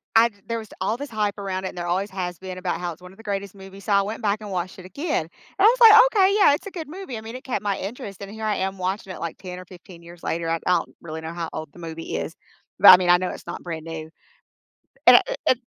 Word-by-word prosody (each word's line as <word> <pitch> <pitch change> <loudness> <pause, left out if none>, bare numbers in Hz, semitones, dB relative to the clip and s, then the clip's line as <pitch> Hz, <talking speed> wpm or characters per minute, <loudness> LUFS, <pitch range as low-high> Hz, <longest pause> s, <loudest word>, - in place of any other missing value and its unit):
I 230 +1 +6 0.2
There 230 0 -2
was 220 - -9
all 215 +4 0
this 285 +2 -6
hype 210 -2 -1
around 190 -1 -3
it, - - -2
and - - -12
there 175 0 -3
always 190 +4 0
has 180 -3 -4
been, 185 -1 -7
about 180 -1 -3
how 175 - -2
it's 165 - -12
one 180 +1 -12
of 195 - -20
the 225 - -14
greatest 200 -1 -4
movies, 195 0 -12
so 210 - +1
I 200 - +5
went 210 +3 -5
back 210 0 0
and 210 -2 -7
watched 185 0 -3
it - - -10
again, 290 - -2
and 160 - -10 0.3
I - - +4
was 475 +4 +6
like, 440 -2 +10
"Okay, 400 -4 +3
yeah, 340 -8 +6
it's 345 +7 -3
a - - -7
good 325 -5 -7
movie," 330 - -7
I - - -7
mean, 225 +2 -8
it - - -15
kept 225 -6 -2
my 200 -2 0
interest, 200 -1 -7
and 200 - -7
here 220 0 -8
I 210 - +1
am 190 +1 -2
watching 190 +1 -3
it, - - -9
like, 170 - -4
10 180 -2 -8
or - - -9
15 175 -1 -14
years 170 0 -13
later, 165 0 -2
I'm 165 0 0
I 180 - +4
don't - - -10
really 160 -1 -7
know 160 +1 -6
how 170 -1 -4
old 155 -2 -6
the 175 - -14
movie 165 -1 -5
is, 165 - -5 0.4
but - - +10
I 185 - +12
mean, 180 -1 -1
I 175 - +8
know 185 0 -2
it's - - -9
not - - -6
brand-new. 160 -2 -6 1.0
And - - +11
eh - - -3
eh - - +7
190 Hz, 300 wpm, -24 LUFS, 175-220 Hz, 1.0 s, I